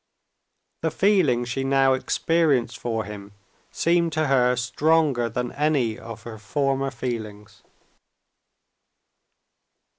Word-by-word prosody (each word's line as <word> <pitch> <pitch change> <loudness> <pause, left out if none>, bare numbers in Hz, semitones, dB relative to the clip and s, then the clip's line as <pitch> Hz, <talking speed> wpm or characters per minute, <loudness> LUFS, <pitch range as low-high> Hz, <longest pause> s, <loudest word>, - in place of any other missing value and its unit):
The 160 - 0
feeling 160 - +2
she 125 +2 -3
now 135 0 +3
experienced 135 -3 +1
for 115 -2 -2
him 100 -1 -9 0.4
seemed 170 0 +1
to 155 0 +1
her 125 -3 +3
stronger 130 0 +1
than 125 +2 -3
any 140 -7 0
of 115 -2 -9
her 110 -2 -9
former 135 +4 -1
feelings. 110 -5 -6
130 Hz, 100 wpm, -24 LUFS, 115-150 Hz, 0.4 s, now